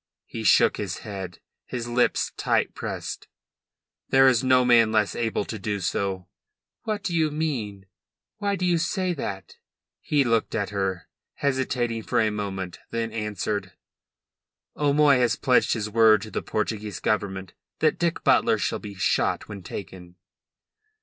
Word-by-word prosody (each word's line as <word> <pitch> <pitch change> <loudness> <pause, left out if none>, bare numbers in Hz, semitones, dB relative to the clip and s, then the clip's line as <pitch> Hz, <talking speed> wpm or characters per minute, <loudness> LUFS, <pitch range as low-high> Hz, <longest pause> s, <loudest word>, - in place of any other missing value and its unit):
He - - -6
shook - - +5
his - - -4
head, 95 -4 -7 0.2
his 120 -2 -5
lips 120 +1 +1
tight - - 0
pressed. - - -5 0.8
"'There 135 0 +6
is 125 -1 +3
no 130 -1 +4
man 115 -3 +5
less 105 -2 +1
able 115 -3 -1
to 110 - -6
do 100 +1 -2
so." 95 0 -2 0.6
"What 215 -2 -2
do 170 - -2
you 160 -2 +2
mean? 125 -11 -3 0.5
Why 200 -1 0
do 185 -1 -2
you 175 -2 +2
say 180 +2 0
that?" 100 - -6 0.4
He 145 -2 +1
looked 115 -3 0
at 100 -1 -1
her, 95 -3 -2 0.3
hesitating 130 -4 -1
for 120 +2 0
a 110 -2 +2
moment, 95 -3 -4
then 115 -1 -2
answered 105 -2 -2
her: - - -21 1.1
"'O'Moy 145 -2 +5
has 120 -1 +2
pledged 125 -1 +3
his 110 -2 -2
word 110 -1 +5
to 110 - -9
the - - -2
Portuguese 105 -3 -3
Government 95 -3 -2 0.2
that 155 - +1
Dick 170 -1 0
Butler - - +4
shall - - -1
be 100 -1 -9
shot 95 - 0
when 100 -2 -8
taken." 90 -1 -9
110 Hz, 155 wpm, -25 LUFS, 100-130 Hz, 1.1 s, There